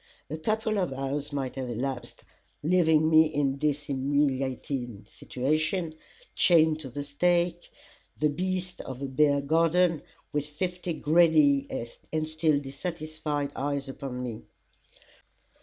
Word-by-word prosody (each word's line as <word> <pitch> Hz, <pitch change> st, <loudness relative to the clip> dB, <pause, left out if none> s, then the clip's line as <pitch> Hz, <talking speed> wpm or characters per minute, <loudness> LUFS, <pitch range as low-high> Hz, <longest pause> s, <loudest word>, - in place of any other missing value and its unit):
A 155 Hz, -, -2 dB
couple 215 Hz, +4 st, 0 dB
of 180 Hz, -6 st, 0 dB
hours 135 Hz, +2 st, -3 dB
might 135 Hz, -3 st, -3 dB
have 130 Hz, -2 st, -3 dB
elapsed 125 Hz, +2 st, -4 dB, 0.4 s
leaving 160 Hz, -2 st, +4 dB
me 160 Hz, 0 st, +6 dB
in 140 Hz, -3 st, -1 dB
this 145 Hz, -1 st, 0 dB
humiliating 135 Hz, -4 st, -1 dB
situation, 155 Hz, +6 st, -1 dB, 0.4 s
chained 160 Hz, -3 st, +4 dB
to 140 Hz, -4 st, -6 dB
the 145 Hz, +4 st, -5 dB
stake, 175 Hz, +4 st, +1 dB, 0.5 s
the 150 Hz, -, +2 dB
beast 185 Hz, +2 st, -3 dB
of 130 Hz, +1 st, -7 dB
a -, -, -1 dB
bear 140 Hz, +1 st, +3 dB
garden, 165 Hz, +2 st, +3 dB, 0.3 s
with 145 Hz, 0 st, -1 dB
fifty 180 Hz, +2 st, -3 dB
greedy 155 Hz, -3 st, +4 dB, 0.4 s
and 155 Hz, 0 st, -1 dB
still 155 Hz, -2 st, +2 dB
dissatisfied 150 Hz, 0 st, -4 dB
eyes 140 Hz, 0 st, -2 dB
upon 130 Hz, -2 st, -5 dB
me. 115 Hz, -3 st, -5 dB
150 Hz, 125 wpm, -28 LUFS, 135-160 Hz, 0.5 s, me